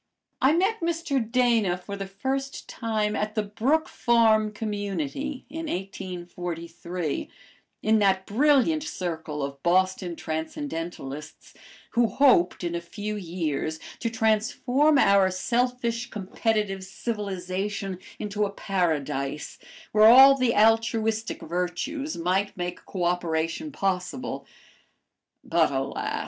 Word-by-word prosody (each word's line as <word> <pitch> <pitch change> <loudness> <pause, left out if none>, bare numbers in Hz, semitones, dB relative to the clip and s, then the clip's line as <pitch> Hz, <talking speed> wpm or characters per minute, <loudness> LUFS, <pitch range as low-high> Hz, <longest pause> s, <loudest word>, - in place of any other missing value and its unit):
I 270 +3 +5
met 385 +7 +2
Mr. 330 -5 0
Dana 230 -7 +3
for 200 +3 -7
the 195 -1 -5
first 270 +7 -3
time 215 -2 -1
at 210 +1 -2
the 215 - +1
Brook 250 +10 +1
Farm 220 -2 +3
Community 210 - -3
in 320 +3 -6
1843, 175 - -5 0.5
in 220 0 +4
that 190 -2 +2
brilliant 295 +6 +3
circle 165 - -4
of 140 0 -5
Boston 185 +1 +1
transcendentalists, 160 - -5 0.4
who 235 0 +3
hoped 240 -11 +3
in 170 -1 -2
a 170 - -2
few 210 +5 -5
years 165 -4 -3 0.2
to 230 - -1
transform 230 +6 +2
our 200 -6 +5
selfish, 240 +4 -1
competitive 210 -1 -1
civilization 195 -2 -4 0.2
into 210 0 -2
a 205 - +1
Paradise 150 -8 -2 0.3
where 215 0 +7
all 265 +3 +9
the 255 -3 +1
altruistic 225 0 +2
virtues 180 - -3
might 185 +4 0
make 180 0 -4
co 185 -3 -3
operation 175 - -1
possible. 195 +2 -2 1.0
But - - +2
alas! - - -2
205 Hz, 110 wpm, -26 LUFS, 180-240 Hz, 1.0 s, all